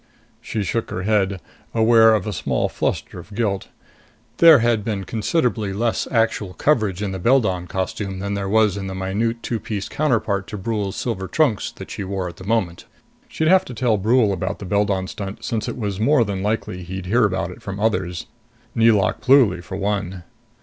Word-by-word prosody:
She 110 - -3
shook 115 +4 -2
her 90 - -4
head, 100 -2 +1 0.4
aware 110 0 +6
of 105 - -2
a 105 - -3
small - - -1
fluster - - -3
of 105 - -12
guilt. 100 -4 -1 0.7
There 165 -3 +8
had 115 -3 +1
been 105 -3 -2
considerably 110 - -1
less 115 +3 -1
actual 110 -5 0
coverage 105 - +1
in 100 - -2
the 95 - -4
Beldon 95 -5 +2
costume 95 +1 -3
than 100 +1 -3
there 100 -1 -2
was 105 -1 +3
in 95 -1 -4
the 95 - -5
minute 105 +5 -2
two 115 - -2
piece 100 -3 -4
counterpart 110 -9 0
to 105 - -6
Brule's 100 -1 -2
silver 95 -6 -3
trunks 125 - +1 0.2
she - - -5
wore 95 -1 -3
at 85 0 -9
the - - -10
moment. 100 -6 -1 0.4
She'd 160 - -1
have 185 +2 +5
to 125 - -8
tell 110 -3 +1
Brule 110 0 +3
about 95 +2 -3
the 100 - -8
Beldon 100 -1 +1
stunt, 95 +1 -7
since 110 -2 -2
it - - -5
was 100 -4 -3
more 135 +3 +4
than 100 -2 -3
likely 105 -3 -2
he'd 90 +1 -6
hear 115 +5 +3
about 95 -2 -1
it - - -12
from 100 0 -6
others 95 -5 -1 0.5
Nelauk 110 -5 +3
Pluly, 120 -10 +4
for 95 0 -6
one. 100 -3 -2
105 Hz, 190 wpm, -21 LUFS, 95-115 Hz, 0.7 s, There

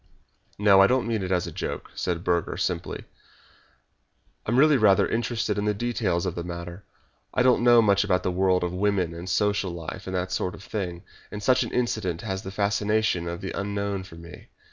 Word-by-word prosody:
"No, 100 -2 +6
I 95 - +7
don't 125 +1 +1
mean 115 -3 -1
it 95 0 -3
as 90 -2 +1
a - - -6
joke," - - -5
said 85 -1 -3
Burger, 85 -2 0
simply. - - -3 1.4
"I - - -1
am 120 - +2
really 150 +2 +6
rather 105 -6 +4
interested 115 -3 -1
in 105 - -1
the 105 0 +1
details 100 -6 -1
of 90 - -2
the 85 - -5
matter. 85 +2 -7 0.5
I 125 - +3
don't 125 -1 +4
know 120 -1 +6
much 100 -1 +3
about 90 -3 +1
the 90 - 0
world 90 0 +2
and 90 +1 -3
women 95 -4 +1
and 85 +2 -7
social 100 +1 +1
life 85 0 -7
and 95 - -3
that 90 0 -2
sort 90 0 -2
of - - -13
thing, 90 -4 -5 0.3
and 105 0 -7
such 130 +3 +4
an - - -2
incident 110 -8 -1
has 95 -3 -4
the 95 - -7
fascination 100 -2 0
of 85 0 -5
the 95 - -4
unknown 100 -1 -3
for 95 -3 -12
me. 85 +1 -12
95 Hz, 210 wpm, -25 LUFS, 90-105 Hz, 1.4 s, I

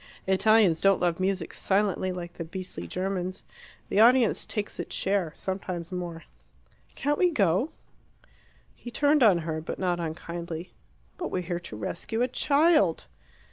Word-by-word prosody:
Italians 195 -2 +4
don't 195 -1 +4
love 175 -1 0
music 185 -2 -1
silently, 195 -1 0
like 175 -1 -6
the 170 - -5
beastly 175 - -6
Germans. 185 - -3 0.5
The 200 - +1
audience 240 0 +5
takes 210 -1 -4
its - - -5
share 190 -4 0
sometimes 185 -2 -4
more." 175 -2 -5 0.7
"Can't 290 +1 0
we 360 - +5
go?" 200 - +2 1.0
He 240 - -10
turned 290 +4 +3
on 210 -7 +6
her, 160 -1 -2
but 160 - -5
not 180 -2 0
unkindly. 170 +1 -5 0.5
"But 345 - -2
we're 180 - -2
here 175 0 -3
to 170 -10 -9
rescue 225 - -3
a - - +2
child!" 280 - +3
185 Hz, 145 wpm, -27 LUFS, 170-220 Hz, 1.0 s, on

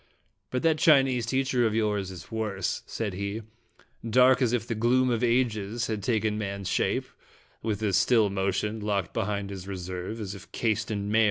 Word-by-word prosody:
"But 125 +5 -2
that 160 -2 +3
Chinese 135 -6 +4
teacher 130 -1 +2
of 110 - -2
yours 105 -3 0
is 90 +1 -10
worse," 105 -4 -2
said 110 -4 -3
he; 100 +4 -4 0.6
"dark 125 +3 +5
as 120 -3 +3
if 120 -2 0
the 115 - -2
gloom 125 +3 +2
of 120 0 0
ages 115 -2 +1
had 110 -2 -3
taken 110 -1 0
man's 100 -2 -4
shape, - - +1 0.6
with 110 -1 -2
as 100 -3 +2
still 110 -1 +4
motion, 100 +3 -1
locked 100 -4 -1
behind 100 -2 -2
his 95 -1 -7
reserve, 95 +2 -5
as 100 -3 -4
if 100 +1 -12
cased 110 -1 -1
in 100 -1 -2
mail. 110 - +4
110 Hz, 180 wpm, -27 LUFS, 100-120 Hz, 0.6 s, dark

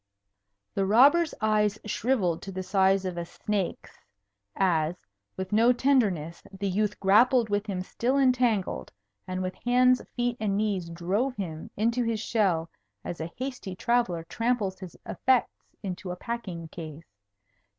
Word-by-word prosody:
The 195 -1 0
robber's 285 - +5
eyes 210 -1 +2
shrivelled 210 -6 0
to 195 - -7
the 185 0 -4
size 190 0 +2
of 180 -2 -3
a - - -2
snake's, 200 0 -4 0.6
as, 175 -2 0 0.3
with 190 0 -4
no 230 +3 +5
tenderness, 215 - +1
the 195 +1 -4
youth 210 +2 0
grappled 230 +4 +4
with 205 +1 -1
him 185 -3 -2
still 250 +8 -1
entangled, 245 - +1 0.4
and 185 0 -3
with 185 0 -3
hands, 250 +1 +4
feet, 245 -1 0
and 200 -2 0
knees 200 -5 -1
drove 195 +10 -1
him 165 -7 -5
into 230 +4 +1
his 230 -2 -1
shell 195 -8 +1 0.4
as 170 - -5
a 165 +1 -5
hasty 250 -7 -5
traveller 210 -6 +1
tramples 205 +1 -1
his 185 -3 -10
effects 260 -2 0
into 185 -1 -5
a 180 - -3
packing 185 -7 -5
case. 160 - -9
200 Hz, 145 wpm, -27 LUFS, 180-235 Hz, 0.6 s, robber's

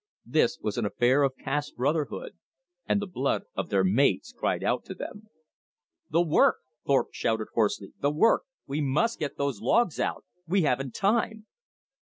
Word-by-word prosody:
This - - +2
was - - -2
an - - -1
affair 130 +4 +3
of 135 -2 +1
caste 145 +2 -3
brotherhood; 155 - -1 0.6
and 205 - +2
the 205 - -3
blood 140 -8 -1
of - - -3
their 95 -1 +2
mates 100 +2 +2
cried - - -1
out - - 0
to - - -7
them. 215 +1 -8 0.8
"The 165 +2 +3
work," 160 -3 +4 0.3
Thorpe 140 -1 +3
shouted 110 -1 -1
hoarsely. 105 -3 0
"The 140 - +3
work! 155 +10 +4 0.2
We 145 +3 -2
must 150 - +1
get 150 -2 -3
those 140 -7 -2
logs 175 - +2
out! - - -2 0.2
We 185 +2 +2
haven't 135 -2 0
time!" 220 +1 0
145 Hz, 165 wpm, -27 LUFS, 125-185 Hz, 0.8 s, work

